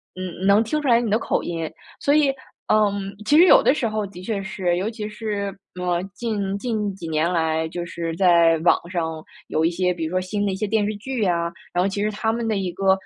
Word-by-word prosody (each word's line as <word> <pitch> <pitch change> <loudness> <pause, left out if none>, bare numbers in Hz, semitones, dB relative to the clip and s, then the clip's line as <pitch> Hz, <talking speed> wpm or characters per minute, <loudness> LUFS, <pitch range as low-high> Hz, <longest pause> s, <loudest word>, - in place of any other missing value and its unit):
嗯， 185 0 -5
能 200 +3 +5
听 270 +7 -1
出 290 - -3
来 235 -1 +5
你 230 - -2
的 215 - +3
口 - - -1
音， 165 -2 -3 0.3
所 285 - +2
以， 300 -2 +4 0.4
嗯， 200 -2 +2
其 290 - +3
实 350 - +8
有 - - +7
的 - - +5
时 245 -6 -1
候 215 -1 -2
的 185 -2 -10
确 200 0 -2
是， 185 -3 -1
尤 190 +4 -1
其 215 -2 -5
是， 210 -2 -3 0.3
呃， 175 -1 0
近 205 -3 -2
近 215 -4 -2
几 170 -4 -8
年 160 +2 +1
来 160 -1 0
就 175 +1 -4
是 165 -1 -4
在 170 -2 +5
网 170 - +4
上 160 -3 -3 0.2
有 160 - +1
一 170 - +2
些， 180 +1 +1
比 170 -2 -3
如 160 - -4
说 185 0 +1
新 205 +2 -2
的 200 - 0
一 - - -2
些 210 +2 -2
电 210 0 +1
视 210 0 -2
剧 240 0 -2
啊。 170 -2 0 0.2
然 180 +1 +2
后 - - +2
其 200 +1 -3
实 215 - 0
它 220 +2 -1
们 230 0 -2
的 215 - 0
一 185 -2 -2
个， 195 +1 +2
195 Hz, 265 characters per minute, -23 LUFS, 175-215 Hz, 0.4 s, 实